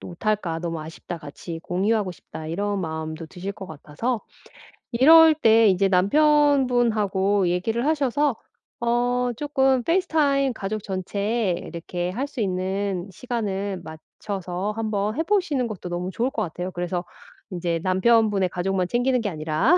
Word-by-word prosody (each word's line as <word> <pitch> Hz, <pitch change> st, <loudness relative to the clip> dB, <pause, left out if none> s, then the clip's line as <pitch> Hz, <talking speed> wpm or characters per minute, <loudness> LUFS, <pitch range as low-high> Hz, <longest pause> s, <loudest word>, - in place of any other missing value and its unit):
또 -, -, -9 dB
못 175 Hz, +4 st, -10 dB
할까? 190 Hz, -6 st, 0 dB
너무 165 Hz, -1 st, -4 dB
아쉽다. 160 Hz, +2 st, -7 dB
같이 165 Hz, +2 st, -8 dB
공유하고 200 Hz, +2 st, 0 dB
싶다.' 155 Hz, -1 st, -10 dB
이런 200 Hz, +3 st, -1 dB
마음도 160 Hz, -1 st, -4 dB
드실 190 Hz, +4 st, -6 dB
것 195 Hz, -2 st, -9 dB
같아서. 160 Hz, -, -3 dB, 0.7 s
이럴 320 Hz, +6 st, +8 dB
때 225 Hz, -6 st, +5 dB
인제 195 Hz, 0 st, +3 dB
남편분하고 225 Hz, -4 st, +3 dB
얘기를 225 Hz, +8 st, -1 dB
하셔서 290 Hz, -2 st, +1 dB, 0.4 s
어 245 Hz, +1 st, +1 dB
조금 265 Hz, -3 st, +2 dB
페이스타임 295 Hz, -6 st, +2 dB
가족 215 Hz, +1 st, -4 dB
전체 200 Hz, +2 st, -1 dB
이렇게 175 Hz, +1 st, -5 dB
할 250 Hz, +9 st, -2 dB
수 280 Hz, -4 st, -5 dB
있는 190 Hz, 0 st, -1 dB
시간을 200 Hz, -4 st, -3 dB
맞춰서 180 Hz, +4 st, -5 dB
한번 215 Hz, -1 st, -1 dB
해 320 Hz, -, +2 dB
보시는 325 Hz, -, +1 dB
것도 195 Hz, -5 st, -7 dB
너무 175 Hz, +1 st, -3 dB
좋을 240 Hz, +6 st, 0 dB
것 -, -, -3 dB
같아요. 180 Hz, +2 st, -4 dB
그래서 175 Hz, 0 st, -3 dB, 0.5 s
인제 175 Hz, -2 st, -1 dB
남편분의 200 Hz, 0 st, +3 dB
가족만 180 Hz, 0 st, -1 dB
챙기는 245 Hz, +2 st, +1 dB
게 210 Hz, -, -1 dB
아니라 160 Hz, -, +2 dB
200 Hz, 315 characters per minute, -24 LUFS, 180-245 Hz, 0.7 s, 이럴